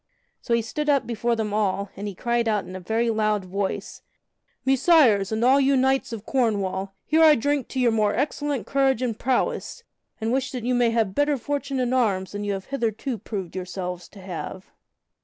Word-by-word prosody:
So 235 Hz, -, +1 dB
he 230 Hz, -, 0 dB
stood 300 Hz, +6 st, -3 dB
up 280 Hz, -2 st, +3 dB
before 235 Hz, 0 st, 0 dB
them 215 Hz, -2 st, -2 dB
all, 200 Hz, -2 st, 0 dB
and 205 Hz, +2 st, -5 dB
he 200 Hz, -, -6 dB
cried 235 Hz, +2 st, 0 dB
in 205 Hz, -4 st, -1 dB
a -, -, -5 dB
very 225 Hz, +5 st, 0 dB
loud 215 Hz, -3 st, 0 dB
voice: 195 Hz, +1 st, -4 dB, 0.6 s
"Messires, 265 Hz, -, +4 dB
and 220 Hz, +2 st, +1 dB
all 265 Hz, +2 st, +6 dB
you 275 Hz, 0 st, +3 dB
knights 265 Hz, 0 st, +1 dB
of 225 Hz, -2 st, -6 dB
Cornwall, 200 Hz, -6 st, -1 dB
here 315 Hz, +3 st, +3 dB
I 310 Hz, -1 st, +8 dB
drink 285 Hz, +1 st, 0 dB
to 260 Hz, -, -4 dB
your 245 Hz, -2 st, +4 dB
more 210 Hz, -2 st, +1 dB
excellent 285 Hz, -3 st, -1 dB
courage 270 Hz, -3 st, +1 dB
and 230 Hz, -3 st, -2 dB
prowess, 265 Hz, -, -1 dB, 0.4 s
and 220 Hz, +1 st, -1 dB
wish 265 Hz, 0 st, 0 dB
that 250 Hz, -3 st, -4 dB
you 250 Hz, -, +1 dB
may 245 Hz, -1 st, +3 dB
have 225 Hz, -4 st, 0 dB
better 290 Hz, +2 st, +2 dB
fortune 275 Hz, +1 st, -3 dB
in 250 Hz, 0 st, 0 dB
arms 200 Hz, -7 st, +1 dB
than 205 Hz, 0 st, -4 dB
you 205 Hz, -1 st, -1 dB
have 195 Hz, -1 st, -5 dB
heretofore 235 Hz, -1 st, -2 dB
proved 190 Hz, -4 st, -6 dB
yourselves 180 Hz, -1 st, -5 dB
to 200 Hz, -, -14 dB
have?" 185 Hz, +1 st, -7 dB
230 Hz, 195 wpm, -24 LUFS, 200-265 Hz, 0.6 s, I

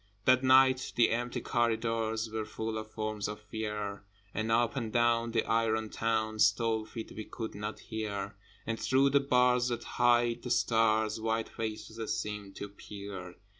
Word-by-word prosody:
That 130 Hz, 0 st, +5 dB
night 130 Hz, 0 st, +5 dB
the 120 Hz, -, +4 dB
empty 120 Hz, +1 st, -1 dB
corridors 115 Hz, -1 st, 0 dB
Were 110 Hz, 0 st, -2 dB
full 110 Hz, +1 st, -4 dB
of 110 Hz, 0 st, -8 dB
forms 110 Hz, -2 st, -3 dB
of 105 Hz, 0 st, -5 dB
Fear, 105 Hz, -1 st, -4 dB, 0.3 s
And 110 Hz, +1 st, -1 dB
up 115 Hz, +2 st, +2 dB
and 115 Hz, -4 st, -3 dB
down 120 Hz, 0 st, +2 dB
the 115 Hz, -1 st, 0 dB
iron 110 Hz, -1 st, +1 dB
town 110 Hz, -1 st, -1 dB
Stole 110 Hz, +1 st, +3 dB
feet 110 Hz, -1 st, -7 dB
we 110 Hz, -, -5 dB
could 115 Hz, -2 st, -6 dB
not 105 Hz, +1 st, -5 dB
hear, 105 Hz, -3 st, -4 dB, 0.3 s
And 115 Hz, 0 st, -2 dB
through 135 Hz, +1 st, +3 dB
the 140 Hz, -, +5 dB
bars 125 Hz, -2 st, +3 dB
that 120 Hz, -1 st, -2 dB
hide 120 Hz, -1 st, +2 dB
the 125 Hz, -, -6 dB
stars 110 Hz, -2 st, +2 dB
White 110 Hz, 0 st, -1 dB
faces 110 Hz, 0 st, -4 dB
seemed 105 Hz, -2 st, -5 dB
to 100 Hz, -, -6 dB
peer. 100 Hz, -3 st, -8 dB
110 Hz, 165 wpm, -31 LUFS, 110-120 Hz, 0.3 s, That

